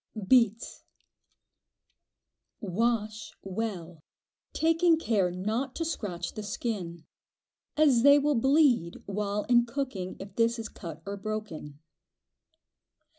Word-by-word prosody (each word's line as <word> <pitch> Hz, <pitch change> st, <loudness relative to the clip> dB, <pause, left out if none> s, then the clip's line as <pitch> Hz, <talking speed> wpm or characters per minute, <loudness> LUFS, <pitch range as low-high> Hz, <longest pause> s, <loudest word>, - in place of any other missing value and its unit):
Beets. 230 Hz, -2 st, +2 dB, 1.8 s
Wash 215 Hz, +2 st, -2 dB
well, 185 Hz, -5 st, -5 dB, 0.5 s
taking 330 Hz, +1 st, +3 dB
care 210 Hz, -, +1 dB
not 215 Hz, +9 st, -3 dB
to 330 Hz, -, -2 dB
scratch 180 Hz, -, -4 dB
the 215 Hz, -, -6 dB
skin, 190 Hz, -6 st, -4 dB, 0.7 s
as 285 Hz, -6 st, +5 dB
they 285 Hz, +3 st, +7 dB
will 295 Hz, +1 st, +2 dB
"bleed" 265 Hz, -, +3 dB
while 205 Hz, +1 st, -2 dB
in 240 Hz, -1 st, +3 dB
cooking 235 Hz, -8 st, -4 dB
if 195 Hz, +1 st, -10 dB
this 230 Hz, +1 st, +2 dB
is 225 Hz, -1 st, -6 dB
cut 165 Hz, -3 st, -9 dB
or 200 Hz, 0 st, -5 dB
broken. 200 Hz, -9 st, -6 dB
215 Hz, 105 wpm, -28 LUFS, 190-250 Hz, 1.8 s, they